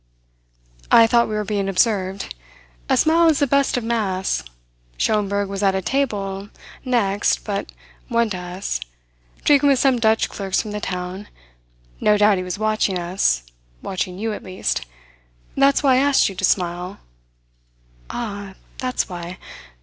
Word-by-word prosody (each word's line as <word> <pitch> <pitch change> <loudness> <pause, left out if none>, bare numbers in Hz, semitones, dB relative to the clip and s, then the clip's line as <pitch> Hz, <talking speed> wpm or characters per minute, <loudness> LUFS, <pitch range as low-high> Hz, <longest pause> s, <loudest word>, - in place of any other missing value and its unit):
"I 230 - +8
thought 235 +1 +3
we 215 - -2
were 210 - -1
being 200 -1 -1
observed. 190 - 0 0.6
A - - +3
smile 330 +1 +4
is 310 - +3
the 285 - +3
best 280 -1 +2
of 245 - -2
masks. 195 - -1 0.5
Schomberg 205 -1 +1
was 195 0 -4
at 195 -1 +3
a 190 - 0
table 205 -7 -2 0.3
next 215 -6 +1
but 200 -2 -3 0.4
one 235 -2 +2
to 185 - -2
us, 180 - -4 0.6
drinking 285 -1 +5
with 275 - +4
some 260 -1 +3
Dutch 220 -1 +3
clerks 195 -2 -2
from 215 - -3
the 210 0 -4
town. 180 +2 -5 0.7
No 210 0 +3
doubt 205 -1 +4
he - - -3
was 180 0 -4
watching 215 -3 +1
us 175 - 0 0.4
watching 185 -1 -3
you, 220 +2 -2
at - - -6
least. 185 - -3 0.7
That's 275 +1 +3
why 270 -2 +5
I - - +4
asked 280 -2 +4
you - - -7
to 185 - 0
smile." 180 +1 -1 1.1
"Ah, 200 -4 -5 0.2
that's 255 -1 -1
why. 175 0 -7
205 Hz, 155 wpm, -21 LUFS, 190-235 Hz, 1.1 s, I